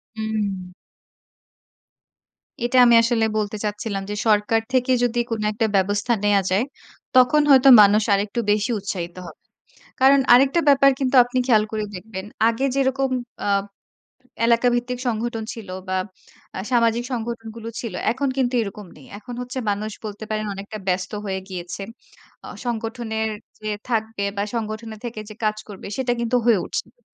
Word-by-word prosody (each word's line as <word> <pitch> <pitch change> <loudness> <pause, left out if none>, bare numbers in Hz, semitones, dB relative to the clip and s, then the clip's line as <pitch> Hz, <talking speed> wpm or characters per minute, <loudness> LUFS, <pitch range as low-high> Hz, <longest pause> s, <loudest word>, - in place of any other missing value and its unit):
হুম। 205 -4 -3 1.9
এটা 255 +1 +1
আমি 235 -1 +6
আসলে 230 -1 +2
বলতে 210 0 -2
চাচ্ছিলাম 210 -1 -3
যে 210 - -3
সরকার 215 +1 +3
থেকে 255 0 +2
যদি 240 0 +1
কোন 225 -2 -2
একটা 220 +1 0
ব্যবস্থা 205 +4 +1
নেয়া 205 -1 +4
যায়, 200 +5 +3 0.5
তখন 255 +4 +6
হয়তো 270 0 +7
মানুষ 205 +1 +5
আরেকটু 200 +4 0
বেশি 215 +4 +1
উৎসাহিত 175 -3 -5
হবে। - - -12 0.6
কারণ 270 +1 +6
আরেকটা 270 +7 +5
ব্যাপার 275 0 +6
কিন্তু 265 -1 -1
আপনি 250 +1 -3
খেয়াল 220 -4 +4
করে 215 -1 -2
দেখবেন। 190 +1 -7 0.2
আগে 230 +4 -1
যেরকম 270 0 +1 0.4
আ - - 0 1.0
এলাকাভিত্তিক 245 +1 +2
সংগঠন 225 0 -2
ছিল 220 -5 -10 0.2
বা 185 - 0 0.6
আ - - -3
সামাজিক 235 -1 +2
সংগঠনগুলো 230 -1 -5
ছিল 230 -6 -6 0.2
এখন 275 +2 -1
কিন্তু 255 -1 0
এরকম 205 -1 -7
নেই। 140 - -15
এখন 245 +2 -9
হচ্ছে 250 +1 -6
মানুষ 210 +1 -3
বলতে 215 0 -6
পারেন 215 0 -2
অনেকটা 200 +2 -7
ব্যস্ত 180 +1 -1
হয়ে 190 -1 -2
গিয়েছে। 180 +1 -6 0.6
আ - - -8 0.2
সংগঠনের 225 -1 -2 0.3
যে 215 0 -4 0.2
থাকবে 220 -2 -1
বা 200 - 0
সংগঠনের 220 -1 -5
থেকে 230 -2 -5
যে 215 - -9
কাজ 215 0 +1
করবে 200 -2 -9
সেটা 255 -2 0
কিন্তু 235 +1 +1
হয়ে 225 -5 +5
উঠছে - - -3
না। - - -38
220 Hz, 155 wpm, -22 LUFS, 205-245 Hz, 1.9 s, হয়তো